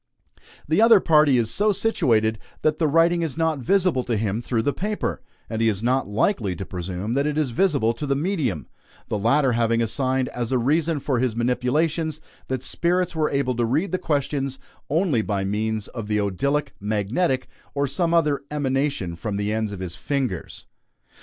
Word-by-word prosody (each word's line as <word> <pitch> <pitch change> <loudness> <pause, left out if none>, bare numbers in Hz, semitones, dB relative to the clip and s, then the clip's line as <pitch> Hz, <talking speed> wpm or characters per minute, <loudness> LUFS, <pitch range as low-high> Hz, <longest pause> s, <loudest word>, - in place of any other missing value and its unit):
The 160 +7 +3
other 225 -2 +7
party 150 -6 +4
is 115 -2 +1
so 210 +1 +2
situated 115 - +1 0.2
that 155 0 +1
the 160 - +3
writing 165 +3 +3
is 160 -4 -3
not 160 -3 +1
visible 180 -1 +2
to 115 -2 0
him 105 +1 -1
through 120 -2 -1
the 145 - +1
paper, 210 +3 -3 0.3
and 110 0 -3
he 115 - +4
is 105 0 -2
not 130 0 +1
likely 105 - 0
to 95 - -6
presume 90 +5 -4
that 140 +3 +1
it 150 0 -2
is 150 -5 0
visible 135 -6 +2
to 130 +5 -5
the 140 - +1
medium; 140 - -1 0.4
the 105 - -1
latter 125 +5 +3
having 115 0 +1
assigned 130 +3 0
as 120 -1 -4
a 130 - +3
reason 150 +5 +1
for 130 -3 -1
his 125 -3 0
manipulations 150 +7 0 0.3
that 130 -1 -3
spirits 175 +3 0
were 155 -1 +1
able 140 -2 0
to 120 - 0
read 150 +12 0
the 185 - 0
questions 140 -3 -1 0.3
only 155 - +2
by 100 -2 -2
means 105 +2 -1
of 115 -4 -6
the 105 0 0
odylic, 140 +10 -1
magnetic, 110 - 0 0.3
or 140 0 +1
some 165 +5 0
other 150 -5 +2
emanation 135 - -1
from 100 +4 -4
the 105 +1 -1
ends 110 -1 -1
of 100 -2 -7
his 90 -2 -5
fingers! 125 - -3
130 Hz, 185 wpm, -23 LUFS, 110-155 Hz, 0.4 s, other